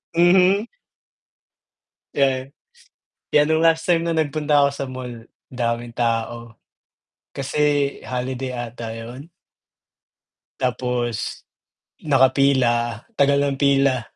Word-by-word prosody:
Mhm. 185 +5 +4 1.5
Yes. 135 -2 +1 0.8
'Yan 150 0 +4
nung 160 +1 +2
last 165 0 +3
time 170 -1 +3
na 170 - -1
nagpunta 150 -2 +1
ako 140 - +4
sa 140 - -4
mall 125 -3 -8 0.2
daming 120 -1 -3
tao. 115 -1 -2 0.7
Kasi 145 0 0
holiday 130 +1 -4
'ata 120 -2 -6
yun? 120 +8 -9 1.3
Tapos, 125 -2 -2 0.6
nakapila, 130 -4 +2
tagal 140 -7 +3
ng 140 -1 -2
pila. 140 -2 +3
130 Hz, 95 wpm, -21 LUFS, 120-145 Hz, 1.5 s, Mhm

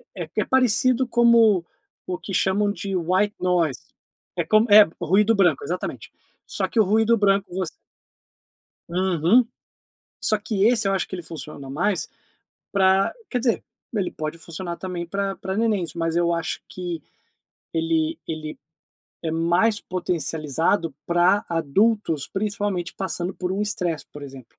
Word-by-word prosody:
é - - -5
é - - +3
parecido 255 0 +3
como 230 -6 +4 0.4
o 180 -1 -3
que 195 - -8
chamam 200 +2 +2
de 195 -2 -4
white 185 +4 +1
noise. 175 -7 +1 0.6
É - - +1
como 215 +2 +4
é, 210 +1 +11 0.2
ruído 200 +6 +3
branco, 200 - +3
exatamente. 435 - -5 0.3
Só - - -2
que 230 - -1
o - - +7
ruído 220 +3 +3
branco, 195 -2 +2
voc 185 -2 -2 1.2
Uhum. 185 +6 +3 0.7
Só 215 - +2
que 205 -2 -1
esse, 220 -4 +3
eu - - +1
acho 190 - 0
que - - -6
ele 180 - -5
funciona 150 -4 -7
mais 185 +6 -1 0.6
pra 190 0 +3 0.2
quer 250 - -1
dizer, 235 -1 0 0.3
ele 195 -3 -1
pode 155 +1 -5
funcionar 170 +1 -6
também 180 -2 -5
pra 195 +2 -2
pra 190 +1 -4
nenéns, 210 -7 0
mas 165 0 -2
eu 170 0 +2
acho 165 -1 -3
que 175 -3 -5 0.7
ele 325 -1 0
ele 155 -1 -5 0.6
é 160 -2 -2
mais 175 +7 +2
potencializado 165 -2 -1
pra 175 +5 +3
adultos, 165 0 +1
principalmente 200 -3 -2
passando 185 -1 -3
por 180 0 -3
um 195 - -1
estresse, 180 -7 -2
por 145 - -10
exemplo. 135 -2 -9
190 Hz, 145 wpm, -23 LUFS, 170-210 Hz, 1.2 s, é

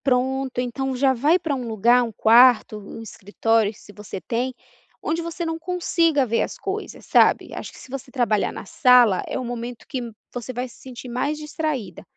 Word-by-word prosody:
Pronto, 265 0 0
então 260 +2 -2
já 265 +1 +3
vai 290 +8 +3
pra 325 -5 -3
um 255 -3 -3
lugar, 230 +3 +4
um 230 - -4
quarto, 225 0 +5
um 210 +2 -9
escritório 220 +1 0
se 205 - -16
você 205 -1 -8
tem, 235 +8 -2 0.5
onde 330 +2 -2
você 335 +1 -4
não 325 0 -3
consiga 335 -4 +1
ver 230 -1 0
as - - -3
coisas, 400 +2 -5
sabe? - - +3
Acho - - -6
que - - -16
se - - -13
você 275 0 -6
trabalhar 235 -6 +1
na - - -8
sala 245 -3 +5
é - - -3
o 255 - -4
momento 240 0 -6
que 265 - -3 0.3
você 245 +1 -5
vai 250 +1 -3
se 240 - -17
sentir 255 -1 -9
mais 255 +5 -2
distraída. 300 - -4
250 Hz, 190 wpm, -23 LUFS, 230-280 Hz, 0.5 s, quarto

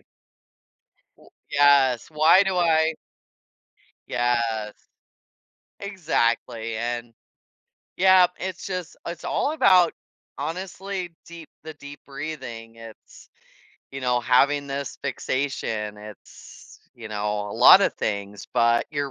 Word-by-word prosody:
O - - -33 1.5
Yes, 140 -4 +4
why 155 +5 +5
do 190 -2 -1
I 160 -2 +3 1.2
Yes. 115 -3 -1 1.1
Exactly, 120 - -1
and 120 0 -4 0.8
Yep, 185 -1 +5
it's 185 -1 -6
just 180 -3 -5
it's 170 -1 -7
all 290 - 0
about 185 - +4 0.4
honestly 185 0 -5
deep 170 -2 -12
the 160 0 -8
deep 145 -1 -11
breathing, 130 -6 -8
it's, 115 -1 -14 0.6
you 135 - -7
know, 125 -1 +1
having 140 +4 +2
this 140 0 -5
fixation, 110 -6 -3
it's, 105 -1 -14
you 115 -2 -10
know, 105 -1 -3
a - - -6
lotta - - +7
things. 100 -1 -5
But 115 -1 +2
you're 145 -2 -3
140 Hz, 105 wpm, -24 LUFS, 115-170 Hz, 1.5 s, lotta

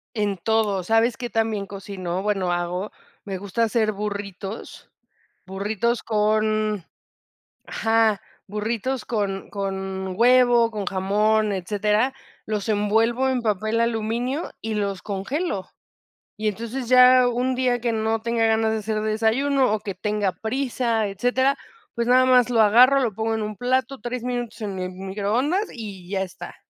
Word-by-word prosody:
en 205 -3 -1
todo. 210 -2 +1
¿Sabes 225 +4 +2
qué 240 -2 -5
tan 225 +1 +1
bien 205 -2 -3
cocino?, 190 -2 -5
bueno, 195 -4 0
hago. 175 +3 -2 0.3
Me 195 -2 -4
gusta 200 +4 -2
hacer 220 -1 +1
burritos, 200 0 -6 0.6
burritos 215 +5 -1
con 215 -2 +1 0.8
ajá, 225 -2 +1 0.3
burritos 225 +4 -2
con 200 -4 -3
con 190 -1 -4
huevo, 245 -1 +5
con 210 -3 -4
jamón, 210 +3 +1
etcétera, 210 +6 0 0.3
los 215 0 -3
envuelvo 225 +5 +2
en 255 -2 0
papel 215 +1 0
aluminio 235 +6 -1
y 220 -1 -3
los 200 -2 -2
congelo. 205 - -3 0.7
Y 215 0 -2
entonces 230 +4 -3
ya 255 0 +7
un 245 +2 0
día 250 -1 +1
que 235 -1 0
no 220 0 0
tenga 230 0 +1
ganas 220 0 +2
de 220 - 0
hacer 215 0 -2
desayuno, 230 +5 +2
o 215 - 0
que 200 - -4
tenga 210 -2 -1
prisa, 230 0 -1
etcétera, 250 +7 +1 0.4
pues, 235 0 -2
nada 255 +1 +5
más 250 -1 +5
lo 235 -2 +3
agarro, 245 +6 +6
lo 230 -5 0
pongo 225 +2 -1
en 220 - -2
un 210 0 -4
plato, 260 +2 0
3 240 +1 -4
minutos 245 -2 -4
en 200 -3 -4
el 185 0 -3
mi 190 +1 -8
microondas 245 - 0
y 200 -6 -8
ya 195 -1 -1
está. 185 -1 -9
220 Hz, 150 wpm, -23 LUFS, 200-240 Hz, 0.8 s, ya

